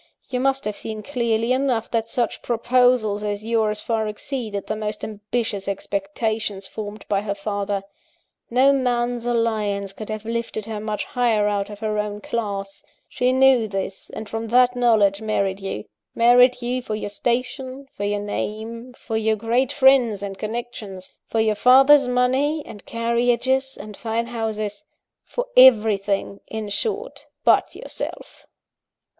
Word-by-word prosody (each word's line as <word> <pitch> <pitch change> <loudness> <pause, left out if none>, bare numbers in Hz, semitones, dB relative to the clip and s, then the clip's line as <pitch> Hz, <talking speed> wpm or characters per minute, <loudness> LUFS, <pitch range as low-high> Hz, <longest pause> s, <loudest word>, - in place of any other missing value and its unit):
You 250 - -1
must 270 +1 +1
have 210 -1 -2
seen 215 0 -6
clearly 235 -3 0
enough, 255 -4 0
that 225 -1 -1
such 235 -1 -1
proposals 240 -3 +2
as 205 0 -3
yours 220 -2 0
far 220 -2 -1
exceeded 210 -2 -4
the 215 - -2
most 210 0 -4
ambitious 210 -1 -3
expectations 200 +1 -2
formed 210 0 -7
by 200 -1 +1
her 205 -1 -3
father. 200 -1 -2 0.7
No 260 +3 +5
man's 245 -2 0
alliance 215 -4 0
could 215 +2 -8
have 215 0 -5
lifted 230 -2 -3
her 220 -2 -4
much 215 0 -3
higher 230 -4 +1
out 200 -1 -1
of 205 0 -10
her 215 -1 -1
own 210 0 -3
class: 200 -3 -4 0.2
she 250 0 +1
knew 260 -3 +5
this, 195 -1 -5
and 215 0 -7
from 225 +1 -4
that 250 +2 +4
knowledge 220 -5 +3
married 200 -3 0
you 195 - -5 0.3
married 245 +1 +5
you 250 +1 -1
for 220 -3 -4
your 215 - -4
station, 255 +5 -2
for 205 - -5
your 205 0 0
name, 225 +4 -5
for 225 -2 -4
your 220 0 +2
great 235 +5 +1
friends 260 -7 +4
and 195 -1 -6
connections, 215 -4 -6 0.2
for 225 - -1
your 220 -1 +3
father's 265 +5 +6
money, 260 +5 +1
and 210 -3 -12
carriages, 245 +3 +1
and 210 0 -9
fine 230 +2 -2
houses; 220 -3 -3 0.4
for - - -3
everything, 210 -5 +5
in 220 -1 -5
short, 435 - -3 0.2
but - - +3
yourself. - - -8
225 Hz, 150 wpm, -22 LUFS, 210-245 Hz, 0.7 s, father's